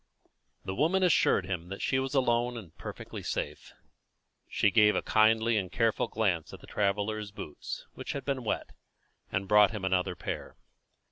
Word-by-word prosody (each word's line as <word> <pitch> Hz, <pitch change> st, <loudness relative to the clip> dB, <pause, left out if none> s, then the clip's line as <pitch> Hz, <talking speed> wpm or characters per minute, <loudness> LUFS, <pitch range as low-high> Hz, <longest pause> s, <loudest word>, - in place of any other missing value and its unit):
The 95 Hz, -, -3 dB
woman 165 Hz, -, +2 dB
assured 165 Hz, -, +4 dB
him 90 Hz, -2 st, -4 dB
that 95 Hz, -, -6 dB
she 130 Hz, -, +2 dB
was 135 Hz, +1 st, -2 dB
alone, 120 Hz, -2 st, +2 dB
and 85 Hz, -8 st, -10 dB
perfectly -, -, -7 dB
safe. -, -, -4 dB, 0.7 s
She 105 Hz, -, +2 dB
gave 105 Hz, +1 st, +5 dB
a -, -, 0 dB
kindly 110 Hz, +1 st, +3 dB
and 95 Hz, -3 st, -2 dB
careful 115 Hz, 0 st, +1 dB
glance 95 Hz, -8 st, 0 dB
at -, -, -14 dB
the -, -, -14 dB
traveller's 105 Hz, +1 st, -1 dB
boots, 75 Hz, -7 st, -7 dB
which -, -, -5 dB
had 140 Hz, -, -5 dB
been 135 Hz, -3 st, -1 dB
wet, 110 Hz, -, -2 dB, 0.6 s
and 95 Hz, +1 st, -1 dB
brought 105 Hz, 0 st, +6 dB
him 105 Hz, -4 st, -4 dB
another 95 Hz, -1 st, +1 dB
pair. -, -, -6 dB
105 Hz, 165 wpm, -30 LUFS, 95-120 Hz, 0.7 s, brought